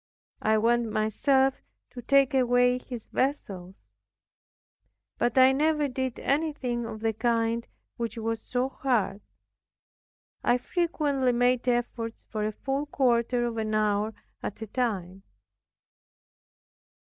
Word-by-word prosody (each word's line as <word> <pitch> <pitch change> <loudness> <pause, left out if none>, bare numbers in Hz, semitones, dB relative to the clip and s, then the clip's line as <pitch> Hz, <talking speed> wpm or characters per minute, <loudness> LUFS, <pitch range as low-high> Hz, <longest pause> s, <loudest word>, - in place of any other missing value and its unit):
I 220 0 +3
went 230 +1 +2
myself 265 +5 +2 0.4
to 250 - -8
take 275 +2 +3
away 245 -1 +3
his 245 -3 -8
vessels. 195 -9 -2 1.4
But 240 +1 +1
I 260 0 +8
never 300 +1 +2
did 260 -1 -3
anything 275 -5 -1
of 215 -1 -7
the 225 0 +1
kind 230 0 0 0.3
which 230 -1 -4
was 225 0 -2
so 250 +1 -1
hard. 225 -8 -1 1.2
I 245 - +3
frequently 285 -4 0
made 245 +1 +2
efforts 240 -2 -1
for 215 -1 -1
a - - -2
full 275 +6 -3
quarter 245 -3 +1
of 235 -1 -3
an 215 -1 -1
hour 210 0 +1 0.3
at - - -5
a - - -4
time. 195 -5 -2
240 Hz, 120 wpm, -27 LUFS, 220-265 Hz, 1.4 s, I